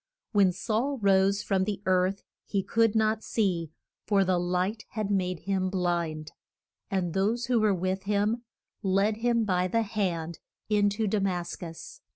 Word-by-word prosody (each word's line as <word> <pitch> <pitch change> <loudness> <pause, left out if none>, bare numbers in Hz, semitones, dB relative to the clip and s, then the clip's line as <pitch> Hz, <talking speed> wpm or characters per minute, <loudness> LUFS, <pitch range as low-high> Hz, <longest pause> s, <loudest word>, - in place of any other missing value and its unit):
When 200 -4 +4
Saul 230 +9 -1
rose 200 -1 +3
from 190 -2 +1
the 205 -1 -2
earth 185 +1 +1 0.2
he 195 -2 0
could 225 +1 +2
not 220 0 +2
see, 180 -7 0 0.4
for 200 -2 +3
the 185 -1 +2
light 180 +5 -1
had 215 -2 -2
made 185 -3 0
him 190 -1 0
blind; 170 -4 -1 0.6
and 185 -5 -1
those 220 +5 +1
who 245 -2 +2
were 215 -1 +3
with 185 +2 -2
him 210 +3 +1 0.4
led 200 +2 +2
him 235 -1 +1
by 180 -2 +1
the 230 +5 +1
hand 180 -6 -2 0.3
in 205 -1 +3
to 215 +2 -1
Da 210 +1 +1
mas 180 -3 -1
cus. 170 - -9
195 Hz, 165 wpm, -28 LUFS, 185-215 Hz, 0.6 s, When